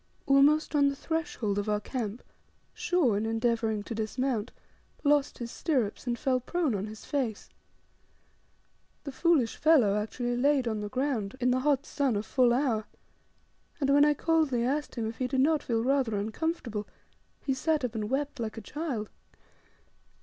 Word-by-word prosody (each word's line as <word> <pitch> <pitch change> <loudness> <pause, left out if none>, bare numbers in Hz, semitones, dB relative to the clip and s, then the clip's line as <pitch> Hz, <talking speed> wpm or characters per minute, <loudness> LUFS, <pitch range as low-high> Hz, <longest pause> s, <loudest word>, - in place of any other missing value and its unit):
Almost 285 +3 +4
on 285 -1 +4
the 280 - 0
threshold 270 -10 -2
of 205 +1 -3
our 210 0 +1
camp 225 0 -4 0.5
Shaw, 340 - +1
in 210 +2 -1
endeavouring 225 -2 0
to 230 - -6
dismount, 225 +1 -2 0.5
lost 290 -1 +2
his 235 -1 -6
stirrups, 250 -7 -1
and 240 -1 0
fell 260 -1 +1
prone 315 +1 -1
on 200 +1 -2
his 215 0 -10
face. 255 -8 -2 1.5
The 280 - -5
foolish 275 -4 +2
fellow 270 -11 +4
actually, 240 +3 -2
laid 275 -1 +2
on 220 -2 -1
the 210 0 -4
ground 255 -4 -1
in 250 0 +2
the 255 - +2
hot 280 +1 +1
sun 275 -7 0
a 205 - -1
full 245 +2 +3
hour; 240 -4 +1 0.9
and 275 -2 +1
when 285 +1 +6
I 295 0 +4
coldly 305 -6 +1
asked 290 +3 -1
him 230 -3 -2
if 225 - -6
he 255 - 0
did 260 0 +1
not 305 +2 +3
feel 230 -2 -1
rather 260 -4 +1
uncomfortable, 220 0 -3 0.6
he 270 - +1
sat 300 +1 0
up, 240 - -4
and 215 -2 -3
wept 285 +1 -2
like 225 -1 -4
a - - -5
child. 260 -3 -4
255 Hz, 170 wpm, -29 LUFS, 220-285 Hz, 1.5 s, when